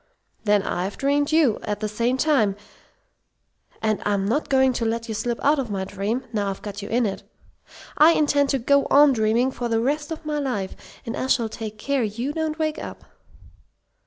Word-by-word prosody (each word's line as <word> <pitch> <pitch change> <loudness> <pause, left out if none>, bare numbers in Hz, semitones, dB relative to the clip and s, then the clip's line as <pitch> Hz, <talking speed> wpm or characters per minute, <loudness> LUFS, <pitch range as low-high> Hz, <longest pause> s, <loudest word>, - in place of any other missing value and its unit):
"Then 205 -1 +3
I've 185 +1 -3
dreamed 285 +1 +1
you, 310 -9 +3
at 210 -1 -3
the 215 - -2
same 235 +4 0
time, 260 -10 +2 1.3
and 215 -1 +1
I'm 200 -1 0
not 240 +10 -1
going 265 -1 +4
to 240 - -2
let 230 +1 -2
you 220 - -3
slip 235 +2 -2
out 290 +1 +3
of 255 -4 -3
my 195 -2 -2
dream, 205 +6 -3
now 205 -2 0
I've 195 - -6
got 205 0 -6
you 205 - -7
in 240 +1 +2
it. 195 -2 -3 0.8
I 315 +3 +8
intend 290 -2 +2
to 275 - +2
go 280 +3 +2
on 285 0 +6
dreaming 225 +2 +2
you - - -9
for 240 -1 -3
the 225 -1 +1
rest 295 +6 -1
of 320 0 -6
my 300 -1 -1
life. 245 -9 -3 0.3
And 230 - -4
I 260 - -2
shall 235 -4 +2
take 215 -1 -7
care 275 +4 -1
you 235 +6 -2
don't 315 -1 -2
wake 310 -1 -1
up!" - - -9
240 Hz, 205 wpm, -23 LUFS, 210-285 Hz, 1.3 s, I